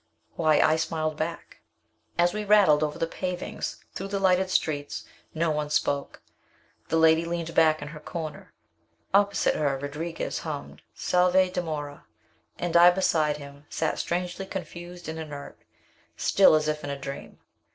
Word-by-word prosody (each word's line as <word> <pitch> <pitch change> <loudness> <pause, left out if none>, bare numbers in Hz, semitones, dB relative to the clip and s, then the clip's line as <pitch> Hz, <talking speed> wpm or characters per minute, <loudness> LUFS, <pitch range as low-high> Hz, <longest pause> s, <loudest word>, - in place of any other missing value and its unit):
Why, 155 -2 +3
I 155 - +4
smiled 155 -1 -1
back! 160 +2 -5 0.6
As 175 0 +3
we 210 0 -2
rattled 200 -8 +5
over 150 0 -1
the 165 - 0
pavings, 180 +2 -5
through 195 - -5
the 200 0 -2
lighted 190 -1 +3
streets, 145 -5 -1 0.3
no 165 0 +1
one 150 -1 -2
spoke. 140 -1 -1 0.6
The 165 - +1
lady 160 0 +5
leaned 170 -1 -3
back 155 -2 +4
in 145 - -7
her 150 0 -9
corner. 155 0 -7 0.6
Opposite 200 0 +3
her 140 -3 0
Rodriguez 150 +4 -4
hummed 150 -3 -6
"Salve! 180 +1 +3
dimora" 150 -5 -4 0.5
and 175 -1 -3
I 170 +1 +9
beside 160 -5 +1
him, 140 0 -12
sat 160 - -1
strangely 180 +2 -3
confused 175 -2 -7
and 160 0 -5
inert, 145 -3 -8 0.6
still 195 -5 +5
as 155 0 +1
if 150 0 -2
in 145 - -4
a 140 - -3
dream. 140 0 -8
160 Hz, 150 wpm, -27 LUFS, 150-180 Hz, 0.6 s, I